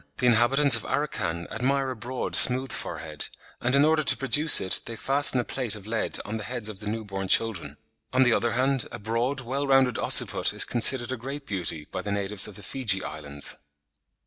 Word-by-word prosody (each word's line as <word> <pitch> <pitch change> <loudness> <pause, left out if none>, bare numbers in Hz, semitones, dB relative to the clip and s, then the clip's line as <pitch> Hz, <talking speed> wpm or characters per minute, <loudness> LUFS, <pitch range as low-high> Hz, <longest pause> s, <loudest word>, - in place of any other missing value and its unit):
The 125 - -2
inhabitants 125 +3 +4
of 115 - -2
Arakhan 90 - -4
admire 135 +3 -2
a - - -7
broad, 125 +3 -5
smooth 130 0 +5
forehead, 80 - -6 0.3
and 125 +2 0
in 140 +1 +3
order 155 0 +1
to - - +1
produce 150 +3 +6
it, 95 - -1
they 115 - -8
fasten 135 +2 +2
a - - -1
plate 120 -5 -1
of 100 -2 -13
lead 110 0 -2
on 110 +2 -6
the 110 - -8
heads 120 -3 -4
of 100 -3 -10
the 105 0 -5
new 110 0 -5
born 95 -1 -6
children. 110 -3 -1 0.3
On 130 +1 +2
the 125 -2 +2
other 120 -1 -1
hand, 130 +1 -1
"a 120 - -8
broad, 115 +5 -3
well 135 +4 -4
rounded 135 -3 +1
occiput - - +3
is - - +4
considered 120 +1 +4
a 130 - -4
great 140 +4 -8
beauty" 85 - -5
by 95 - -5
the 100 - -6
natives 100 0 +3
of 105 - -11
the 105 - -8
Fiji 100 -4 -1
Islands. 75 -2 -7
120 Hz, 210 wpm, -24 LUFS, 105-135 Hz, 0.3 s, produce